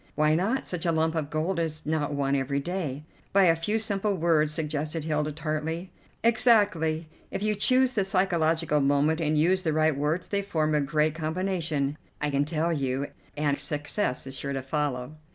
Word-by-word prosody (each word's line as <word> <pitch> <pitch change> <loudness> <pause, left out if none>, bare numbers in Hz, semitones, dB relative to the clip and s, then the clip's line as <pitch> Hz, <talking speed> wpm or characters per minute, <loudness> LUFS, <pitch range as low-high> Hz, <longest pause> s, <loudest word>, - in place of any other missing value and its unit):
"Why 150 +1 +3
not? 200 +11 0
Such 175 -1 -3
a - - +3
lump 160 0 +1
of 155 -3 -2
gold 165 +4 -1
is 155 -2 -3
not 150 -1 -1
won 140 0 +1
every 140 +1 0
day." 150 -3 -4 0.3
"By 195 0 +6
a 165 -3 +5
few 185 +7 -1
simple 205 -2 0
words," 160 -3 +2
suggested 155 0 -3
Hilda 150 -1 -1
tartly. 160 +3 -3 0.3
"Exactly. 205 -9 +3 0.2
If 200 - -4
you 215 0 +2
choose 255 +5 +3
the 205 -5 +2
psychological 165 -5 +1
moment 145 +4 +2
and 155 -1 +1
use 180 +5 +3
the 160 -4 0
right 155 -1 +2
words 150 +5 -1
they 200 -1 0
form 155 -6 0
a 150 - +3
great 150 +2 +1
combination, 160 -3 -2 0.2
I 150 -1 -1
can 140 +1 +1
tell 165 +2 0
you, 135 -1 -1 0.3
and 145 -1 +1
success 150 0 -1
is 135 0 -6
sure 140 0 -3
to 135 -1 -3
follow." 140 0 -2
155 Hz, 185 wpm, -27 LUFS, 150-180 Hz, 0.3 s, By